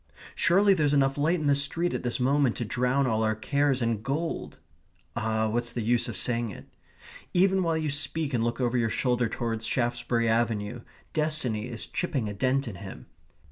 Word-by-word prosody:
"Surely 195 +4 +4
there's 150 -5 +2
enough 135 -1 +3
light 160 +5 +1
in 155 - -3
the 145 - +4
street 145 +5 0
at - - -2
this 120 0 -1
moment 135 -1 +2
to 120 - -3
drown 125 +4 +1
all 110 -3 +1
our 110 -1 +1
cares 140 +3 +1
in 115 -2 0
gold!" 150 +7 -3 0.6
Ah, 110 -1 0
what's 120 +2 -1
the 120 -1 -3
use 120 +2 +2
of 105 - -5
saying 120 +1 0
it? - - -10 0.7
Even 190 +1 +4
while 165 -2 +1
you 155 -2 -1
speak 150 0 -2
and 115 -2 +1
look 120 +1 -1
over 125 -1 +1
your 115 -1 +1
shoulder 125 0 +1
towards 115 -1 -3
Shaftesbury 120 0 0
Avenue, 115 0 0 0.3
destiny 150 -9 0
is 120 -3 -5
chipping 145 -11 -2
a 105 - -4
dent 130 +5 0
in 100 -5 -6
him. 100 0 -9
125 Hz, 190 wpm, -27 LUFS, 115-145 Hz, 0.7 s, Surely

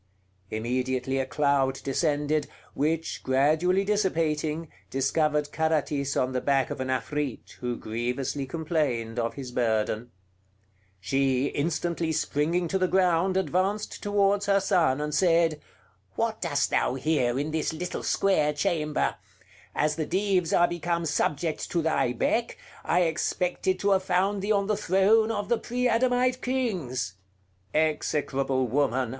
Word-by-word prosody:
Immediately 130 +3 -1
a 130 - -1
cloud 135 +1 +1
descended, 145 +1 0 0.3
which, 160 +3 -1
gradually 155 +8 +2
dissipating, 165 -6 0 0.2
discovered 150 +2 0
Carathis 150 -3 0
on 130 0 +1
the 125 - -1
back 135 -2 +1
of - - -4
an 130 - -2
Afrit, 130 +1 -3
who 125 -1 -2
grievously 125 +5 -3
complained 135 -7 -1
of 115 0 -2
his 130 -3 -7
burden. 110 -1 0 0.9
She, 135 +5 +1
instantly 165 +2 -1
springing 160 +3 0
to 190 - 0
the 185 - +2
ground, 185 0 +2
advanced 190 +3 -1
towards 205 0 +1
her 200 0 +4
son 170 -8 +2
and 150 0 -3
said: 165 -2 +3 0.5
"What - - -1
dost - - 0
thou 125 - +1
here 135 -3 +1
in 145 +3 -2
this 160 0 -1
little 175 +3 -4
square 155 -7 +2
chamber? 150 0 0 0.6
As 150 0 +1
the 155 - -2
Dives 185 -2 +1
are 175 - +4
become 170 0 -2
subject 155 +1 -1
to 170 -2 0
thy 155 -6 +1
beck, 230 - 0 0.3
I 180 - +2
expected 180 +2 0
to 200 - +2
have 190 -1 +4
found 190 +2 +1
thee 205 +2 -1
on 200 -2 +2
the 210 +1 +1
throne 210 +3 +3
of 205 -2 -2
the 235 - +1
pre 250 +1 -1
Adamite 250 +1 +2
Kings." 180 - -2 0.6
"Execrable 135 -4 0
woman!" 130 -1 +1
155 Hz, 140 wpm, -27 LUFS, 135-185 Hz, 0.9 s, her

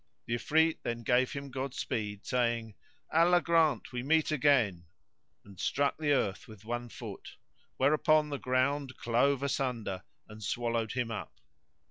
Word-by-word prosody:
The 120 - -3
Ifrit 160 +6 +2
then 120 0 -4
gave 125 +2 +2
him 140 -1 -6
Godspeed, 115 -6 -4
saying, 120 -3 0 0.4
Allah 170 +2 +5
grant 165 -7 +2
we 125 -1 -3
meet 155 +4 +2
again;"[FN#104] 110 - -1
and 100 -3 -15
struck 140 0 +1
the 150 -2 +1
earth 105 -8 0
with 110 -2 -13
one 120 +1 -4
foot, - - -9 0.4
whereupon 155 +2 +3
the 140 -2 -3
ground 130 +1 0
clove 130 +4 +2
asunder 120 -9 -2 0.3
and 110 0 -11
swallowed 115 +1 -1
him 125 -3 -2
up. 115 - -5
125 Hz, 140 wpm, -31 LUFS, 115-145 Hz, 0.4 s, Allah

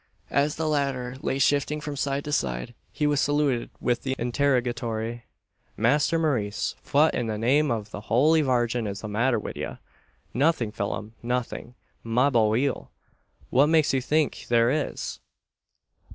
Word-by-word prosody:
As 145 +1 +2
the 160 0 -2
latter 135 -4 -1
lay 135 - -1
shifting 145 +2 +2
from 150 -1 -5
side 140 0 -1
to 150 - -4
side, 60 - -1 0.2
he 150 - -1
was 145 -1 +2
saluted 145 -4 +1
with 120 -1 0
the 130 -1 -2
interrogatory 120 -3 -1 0.5
"Masther 145 +8 +2
Maurice, 125 -11 0
fwhat, 150 +3 +3
in 120 - -1
the 110 -1 -2
name 135 +7 +2
of 110 -3 -3
the 105 - -6
Howly 145 +9 +3
Vargin, 120 -4 +1
is 100 0 -5
the 110 - -5
matther 120 +5 +1
wid 105 - -6
ye?" - - -5 0.6
"Nothing, 135 -5 +1
Phelim 105 +1 -4
nothing, 125 0 -3 0.3
mabohil! 120 +1 +2 0.6
What 140 +4 +5
makes 160 -2 +3
you 135 - +2
think 150 +3 0
there 120 0 +4
is?" 150 +1 -3
125 Hz, 150 wpm, -26 LUFS, 115-145 Hz, 0.6 s, What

